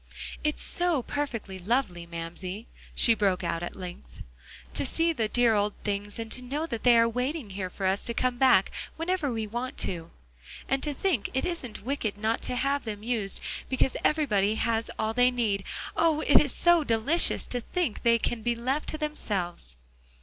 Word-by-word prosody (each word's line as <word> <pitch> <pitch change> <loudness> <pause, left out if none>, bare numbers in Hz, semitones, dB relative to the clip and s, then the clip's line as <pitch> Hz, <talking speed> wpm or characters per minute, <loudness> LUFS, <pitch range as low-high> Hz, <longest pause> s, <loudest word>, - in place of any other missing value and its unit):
"It's 300 0 0
so 345 -7 +1
perfectly 230 -10 -4
lovely, 185 -4 -1
Mamsie," 175 +5 -6 0.3
she 230 - +5
broke 195 -4 +1
out 170 -1 -1
at 175 - -5
length, 180 -2 -9 0.5
"to - - +1
see 330 +5 +1
the 225 -8 0
dear 240 +1 +4
old 205 0 +1
things, 205 0 -2
and 225 -1 -5
to 255 - -1
know 285 +6 -3
that 230 -9 -4
they 245 -2 +6
are 230 0 +5
waiting 250 0 -2
here 190 -1 -4
for 190 +1 -5
us 190 +1 +1
to 235 - -2
come 250 -1 0
back 255 -8 +5 0.3
whenever 330 -3 0
we 225 -2 -2
want 240 +4 -4
to. 170 -2 -2 0.6
And 270 0 +1
to 295 -2 -2
think 310 - 0
it 265 - +1
isn't 265 - -4
wicked 240 -6 -2
not 220 +2 0
to - - -1
have 275 +3 0
them 210 -2 -5
used, 220 -4 -1 0.3
because 260 0 +1
everybody 215 -10 +2
has 225 0 0
all 220 +1 0
they 250 +1 +5
need; 220 -6 0 0.3
oh! 320 -2 +3
it's 285 -1 +5
so 345 +2 +4
delicious 270 +7 +3
to 245 - -3
think 335 - -2
they 235 0 +5
can 230 0 -2
be 235 +2 0
left 260 +6 -1
to 310 - -3
themselves." 190 - -3
235 Hz, 185 wpm, -28 LUFS, 205-275 Hz, 0.6 s, they